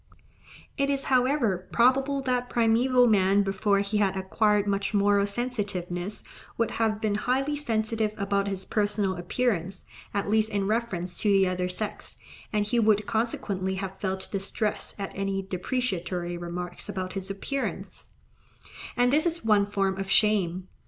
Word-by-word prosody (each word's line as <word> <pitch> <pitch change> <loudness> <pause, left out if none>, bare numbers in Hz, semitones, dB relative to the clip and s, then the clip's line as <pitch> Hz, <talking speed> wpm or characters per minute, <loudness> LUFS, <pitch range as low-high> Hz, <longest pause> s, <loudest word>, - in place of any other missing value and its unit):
It 275 0 +2
is, 275 -1 +1
however, 245 -8 +2
probable 270 +3 +3
that 250 -1 0
primeval 245 +2 +4
man 200 -2 +4
before 200 +1 +1
he 200 +1 -1
had 195 -2 +1
acquired 210 +2 +2
much 200 +1 -1
moral 200 0 +3
sensitiveness 200 -5 -2 0.3
would 230 -1 +1
have 220 -2 0
been 215 -2 0
highly 265 +7 0
sensitive 220 -5 0
about 200 -1 0
his 195 -1 -3
personal 205 -2 0
appearance, 185 0 -1 0.3
at 200 0 -2
least 220 +1 +2
in 200 -2 -1
reference 195 -5 -2
to 210 - +1
the 195 -1 +4
other 180 0 -1
sex, 205 +4 -3 0.3
and 210 -1 +1
he 235 +3 +1
would 215 -2 +3
consequently 205 -4 -1
have 190 0 -5
felt 190 -1 -2
distress 200 +2 -1
at 195 -1 -4
any 195 0 -2
depreciatory 185 -3 -2
remarks 175 +1 -5
about 185 -1 -4
his 195 -1 -4
appearance; 265 +8 -4 0.9
and 245 +1 +3
this 310 +3 +3
is 335 -6 -2
one 205 -2 +4
form 195 -2 0
of 195 0 -4
shame. 190 -4 +2
205 Hz, 150 wpm, -27 LUFS, 190-230 Hz, 0.9 s, primeval